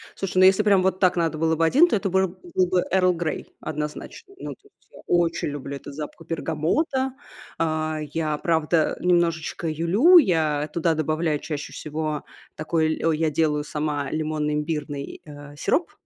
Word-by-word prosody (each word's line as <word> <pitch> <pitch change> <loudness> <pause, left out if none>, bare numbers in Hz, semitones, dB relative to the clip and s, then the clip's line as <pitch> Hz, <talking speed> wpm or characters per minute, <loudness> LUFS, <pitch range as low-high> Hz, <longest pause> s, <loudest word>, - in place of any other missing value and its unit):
Слушай, 190 -1 -4
ну - - +7
если 190 +3 +5
прям 200 -3 +4
вот 190 0 +1
так 185 -1 +3
надо 165 -2 0
было 160 +1 +1
бы 165 +1 +2
1, 295 - +5
то - - +1
это 195 -1 -1
быро 190 +1 +2
был 185 - -2
бы 180 0 +1
"Эрл 185 -1 +4
Грей", 170 -2 -4
однозначно. 150 - -6
Ну - - -6
тут, 415 0 -24 0.2
э - - -14
очень 170 -2 +1
люблю 140 -1 -6
этот 140 0 -9
запах 155 +2 -8
бергамота. 215 - -1 0.4
А 155 -1 -1
я, 155 -2 -1
правда, 160 -1 +1
немножечко 170 -1 +1
юлю. 190 - +5
Я 155 - +2
туда 165 -1 +1
добавляю 155 0 0
чаще 150 -1 -6
всего 155 0 -4 0.3
такой 155 0 0
ль - - -7
о, 165 - +4
я 155 0 +1
делаю 150 -1 +1
сама 150 -2 -3
лимонно-имбирный, 150 -2 -3
а, 145 0 -11
сироп. 335 - 0
160 Hz, 170 wpm, -24 LUFS, 150-180 Hz, 0.4 s, ну